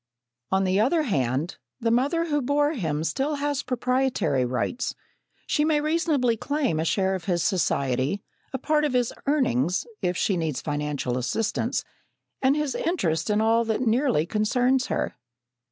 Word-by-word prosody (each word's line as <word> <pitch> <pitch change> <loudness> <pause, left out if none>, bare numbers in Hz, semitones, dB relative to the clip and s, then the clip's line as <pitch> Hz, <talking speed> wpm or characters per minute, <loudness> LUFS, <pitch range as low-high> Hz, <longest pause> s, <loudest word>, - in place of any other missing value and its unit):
On 190 0 +2
the 190 +1 +2
other 305 +9 +3
hand, 140 - -1 0.2
the 230 -2 +1
mother 285 +8 +2
who 295 -3 0
bore 290 +3 +2
him 160 - -2
still 275 - -1
has 285 0 -1
proprietary 250 - 0
rights. 125 - -2 0.5
She 300 - +1
may 305 -1 +3
reasonably 305 -6 +1
claim 265 - -1
a 160 - 0
share 190 +2 +1
of 185 -3 -4
his 175 -3 +1
society, 140 -3 0 0.3
a 265 - -2
part 300 +3 +1
of 295 -3 0
his 245 -2 +1
earnings, 180 - +1 0.2
if 180 0 0
she 195 - +1
needs 160 -5 -1
financial 145 -4 -2
assistance, 200 - -1 0.6
and 265 +1 +4
his 300 -3 -1
interest 165 - -1
in 210 +1 +2
all 225 +1 +3
that 220 +1 -1
nearly 240 - +2
concerns 245 +6 +1
her. - - -1
230 Hz, 155 wpm, -25 LUFS, -, 0.6 s, and